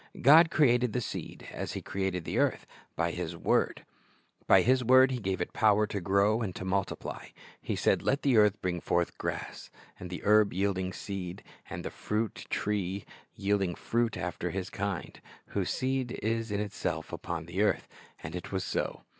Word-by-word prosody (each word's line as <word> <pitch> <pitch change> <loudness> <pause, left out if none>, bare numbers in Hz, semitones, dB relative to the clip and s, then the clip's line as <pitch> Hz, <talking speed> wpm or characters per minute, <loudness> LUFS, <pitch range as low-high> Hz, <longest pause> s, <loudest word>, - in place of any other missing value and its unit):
God 160 +5 +8
created 125 -6 +3
the 125 - +1
seed, 120 - -6
as - - -4
He - - -4
created 95 -3 -2
the - - -1
earth, - - +1 0.3
by 85 +1 0
His 85 -1 -4
word. - - +1 0.6
By - - +7
His 130 +1 +3
word 130 +2 +6
He 125 - -2
gave 95 -3 -2
it - - -3
power 105 -1 +4
to 100 -1 -4
grow 100 +5 +3
and 95 -5 -4
multiply. 95 +1 -2 0.3
He - - -2
said, - - +2
"Let 140 - 0
the 135 -4 +3
earth 105 -1 +5
bring 90 -2 -1
forth 85 0 0
grass, - - -4 0.3
the 90 0 -6
herb 105 -1 +5
yielding 95 -1 0
seed, 95 -1 -6 0.3
and - - -6
the - - -3
fruit 105 - -3
tree 100 -2 -1 0.3
yielding 100 -3 0
fruit 120 0 0
after 90 0 -3
his 95 +1 -4
kind, 100 -2 -4 0.3
whose - - -1
seed 130 -1 -1
is 115 +1 0
in 100 - 0
itself, 105 -1 -3
upon 85 -2 -4
the 90 +4 -2
earth; 105 - +1 0.4
and 80 +3 -6
it 90 - -6
was 95 -1 -1
so. - - -2
100 Hz, 175 wpm, -30 LUFS, 90-115 Hz, 0.6 s, God